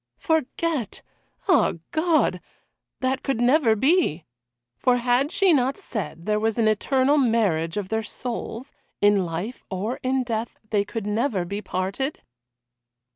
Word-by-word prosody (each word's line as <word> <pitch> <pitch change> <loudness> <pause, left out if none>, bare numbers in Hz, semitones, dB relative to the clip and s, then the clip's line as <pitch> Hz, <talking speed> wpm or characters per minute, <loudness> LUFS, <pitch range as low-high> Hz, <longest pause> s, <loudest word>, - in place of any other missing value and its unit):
Forget! 320 - -1 0.4
Ah 370 - +4 0.2
God! 320 0 +2 0.6
that 260 +1 0
could 270 -5 -1
never 245 -2 +4
be. 265 - +2 0.5
For 250 - +3
had 245 +4 +1
she 380 -2 +4
not 265 -1 +2
said 185 -6 -6
there 210 0 +1
was 220 +1 0
an 225 -2 +3
eternal 265 +6 +2
marriage 210 - +1
of 200 -2 -3
their 220 0 0
souls 235 +2 -6 0.3
in 205 -1 +4
life 175 +9 -5
or 200 +6 -3
in 260 0 +1
death 230 -1 -3
they 205 -2 +2
could 215 +1 -5
never 210 -3 0
be 200 +4 -4
parted? 200 +11 -3
235 Hz, 135 wpm, -24 LUFS, 205-270 Hz, 0.6 s, Ah